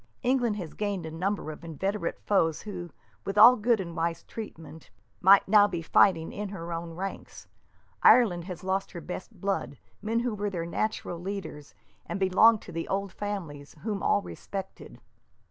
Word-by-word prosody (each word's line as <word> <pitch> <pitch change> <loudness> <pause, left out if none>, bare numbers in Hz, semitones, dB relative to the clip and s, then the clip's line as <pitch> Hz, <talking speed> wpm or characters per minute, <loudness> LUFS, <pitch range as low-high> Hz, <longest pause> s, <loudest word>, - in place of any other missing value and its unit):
England 245 -4 +2
has 175 -7 -6
gained 200 -5 -3
a 160 - -6
number 185 0 -2
of 155 - -11
inveterate 190 +6 -3
foes 165 -6 +2
who, 180 -5 -6 0.3
with 195 - -4 0.3
good 230 0 +3
and 170 -3 -5
wise 165 0 -2
treatment, 160 -8 -9 0.3
might 195 +2 +6
now 205 +1 +6
be 175 -4 -4
fighting 165 -1 +3
in 205 0 -5
her 170 -3 -6
own 165 0 -5
ranks. 195 +2 -7 0.6
Ireland 180 -9 +5
has 180 -2 -7
lost 190 +1 -2
her 170 - -6
best 180 +3 -7
blood, 195 -8 -2 0.2
men 225 +2 0
who 240 -2 -1
were 205 0 -2
her 175 -4 -4
natural 175 -1 -3
leaders, 175 -6 -7 0.3
and 175 +3 -4
belonged 205 +4 +5
to - - -10
the 165 - -4
old 195 0 -2
families, 170 -9 -6
whom 210 -2 -2
all 205 - +2
respected." 195 -1 -8
190 Hz, 165 wpm, -28 LUFS, 165-205 Hz, 0.6 s, might